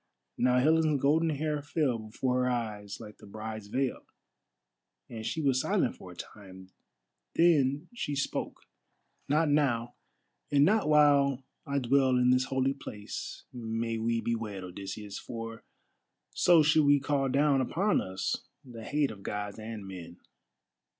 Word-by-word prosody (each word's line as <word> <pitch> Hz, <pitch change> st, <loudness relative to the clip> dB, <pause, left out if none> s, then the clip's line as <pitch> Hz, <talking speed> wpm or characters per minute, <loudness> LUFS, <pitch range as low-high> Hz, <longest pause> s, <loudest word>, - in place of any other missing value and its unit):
Now 125 Hz, 0 st, +3 dB
Helen's 155 Hz, +2 st, +3 dB
golden 155 Hz, +5 st, +3 dB
hair 150 Hz, 0 st, -1 dB
fell 145 Hz, -5 st, 0 dB
before 125 Hz, +4 st, -1 dB
her -, -, +1 dB
eyes 105 Hz, -4 st, -3 dB
like 105 Hz, -, -11 dB
the 105 Hz, -, -14 dB
bride's 110 Hz, 0 st, -7 dB
veil, 130 Hz, +4 st, -1 dB, 1.1 s
and 110 Hz, -2 st, -7 dB
she 160 Hz, +7 st, -2 dB
was 130 Hz, -2 st, +2 dB
silent -, -, +1 dB
for -, -, -12 dB
a -, -, -12 dB
time. 95 Hz, -2 st, -11 dB, 0.6 s
Then 150 Hz, -2 st, +3 dB
she 145 Hz, -11 st, -3 dB
spoke: 140 Hz, -, -3 dB, 0.7 s
"Not 155 Hz, +3 st, +3 dB
now, 125 Hz, -5 st, +1 dB, 0.6 s
and 145 Hz, 0 st, +5 dB
not 210 Hz, -4 st, +2 dB
while 140 Hz, -3 st, +4 dB, 0.2 s
I 140 Hz, 0 st, -1 dB
dwell 130 Hz, 0 st, +3 dB
in 125 Hz, 0 st, +4 dB
this 130 Hz, +1 st, +3 dB
holy 135 Hz, 0 st, 0 dB
place 105 Hz, -6 st, -7 dB
may 115 Hz, -1 st, -3 dB
we 115 Hz, +1 st, 0 dB
be 115 Hz, +1 st, -1 dB
wed, 105 Hz, -4 st, -4 dB
Odysseus, 100 Hz, +2 st, -7 dB
for 115 Hz, -1 st, -7 dB, 0.7 s
so 170 Hz, -3 st, +5 dB
should 155 Hz, 0 st, +4 dB
we 145 Hz, 0 st, +5 dB
call 140 Hz, -1 st, 0 dB
down 140 Hz, 0 st, +3 dB
upon 190 Hz, +11 st, +1 dB
us 95 Hz, 0 st, -2 dB, 0.3 s
the 115 Hz, -3 st, -10 dB
hate 145 Hz, +2 st, 0 dB
of 100 Hz, -3 st, -11 dB
Gods 105 Hz, +1 st, -4 dB
and 110 Hz, -2 st, -7 dB
men. 90 Hz, -2 st, -9 dB
125 Hz, 150 wpm, -30 LUFS, 110-145 Hz, 1.1 s, and